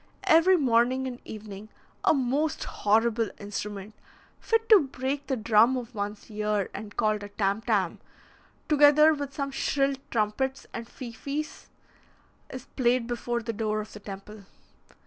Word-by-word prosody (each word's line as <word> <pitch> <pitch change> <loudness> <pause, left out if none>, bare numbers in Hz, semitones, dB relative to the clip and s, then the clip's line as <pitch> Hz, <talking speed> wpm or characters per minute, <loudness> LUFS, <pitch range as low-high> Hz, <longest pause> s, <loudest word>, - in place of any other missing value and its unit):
Every 340 +4 +5
morning 255 -1 +2
and 250 -1 -7
evening 210 -1 -9 0.3
a - - +5
most 280 +2 0
horrible 225 +1 +1
instrument, 205 0 -6 0.5
fit 455 0 0
to 430 -3 +9
break 270 +2 -3
the 265 -2 -1
drum 230 +3 +4
of 245 0 -7
one's 205 +1 -5
ear, 210 -2 -1
and 205 0 -8
called 215 -1 +1
a 205 - -7
tam 200 +1 -1
tam, 205 -7 0 0.7
together 300 +1 +6
with 285 -2 -4
some 275 -2 -2
shrill 275 0 +1 0.2
trumpets 240 +5 -1
and 230 0 -6
fifes, 275 +6 -6 0.8
is 255 0 -8
played 245 -2 +2
before 240 0 -3
the 230 0 -3
door 215 0 -1
of 215 - -7
the 210 - -9
temple. 200 +1 -10
235 Hz, 145 wpm, -27 LUFS, 210-270 Hz, 0.8 s, to